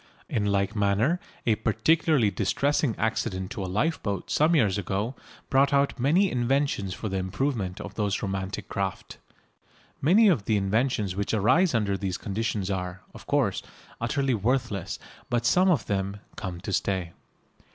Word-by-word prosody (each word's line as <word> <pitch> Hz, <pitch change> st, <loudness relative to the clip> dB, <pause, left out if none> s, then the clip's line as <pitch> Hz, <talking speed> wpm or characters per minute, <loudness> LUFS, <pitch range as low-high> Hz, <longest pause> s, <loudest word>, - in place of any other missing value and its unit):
In 105 Hz, -3 st, 0 dB
like 100 Hz, +1 st, 0 dB
manner 105 Hz, -, +2 dB, 0.3 s
a 115 Hz, -, +4 dB
particularly 135 Hz, +2 st, +2 dB
distressing 135 Hz, +6 st, +1 dB
accident 95 Hz, -4 st, -1 dB
to 100 Hz, -, -4 dB
a 95 Hz, -, -4 dB
lifeboat 100 Hz, -, -1 dB
some 160 Hz, +3 st, +3 dB
years 105 Hz, -, +3 dB
ago 100 Hz, +5 st, -2 dB, 0.4 s
brought 140 Hz, +2 st, +4 dB
out 140 Hz, -1 st, +2 dB
many 170 Hz, +10 st, +3 dB
inventions 125 Hz, -6 st, 0 dB
for 110 Hz, -, -5 dB
the 95 Hz, -1 st, -2 dB
improvement 95 Hz, 0 st, -2 dB
of -, -, -7 dB
those 100 Hz, -2 st, -1 dB
romantic 95 Hz, 0 st, -3 dB
craft. 95 Hz, -1 st, -4 dB, 0.8 s
Many 200 Hz, +10 st, +5 dB
of 150 Hz, -, +2 dB
the 110 Hz, -, +2 dB
inventions 105 Hz, -1 st, 0 dB
which 100 Hz, +2 st, -1 dB
arise 155 Hz, -, +3 dB
under 100 Hz, -4 st, 0 dB
these 95 Hz, -3 st, -2 dB
conditions 105 Hz, -1 st, -2 dB
are, 90 Hz, -1 st, -4 dB
of -, -, -13 dB
course, -, -, +1 dB, 0.4 s
utterly 135 Hz, +3 st, +1 dB
worthless, 115 Hz, -3 st, -1 dB, 0.3 s
but 120 Hz, -1 st, 0 dB
some 180 Hz, +10 st, +4 dB
of 150 Hz, -, +2 dB
them 100 Hz, 0 st, -2 dB, 0.2 s
"come 90 Hz, -5 st, -5 dB
to 100 Hz, -, -4 dB
stay." 95 Hz, -2 st, -1 dB
105 Hz, 150 wpm, -27 LUFS, 95-135 Hz, 0.8 s, Many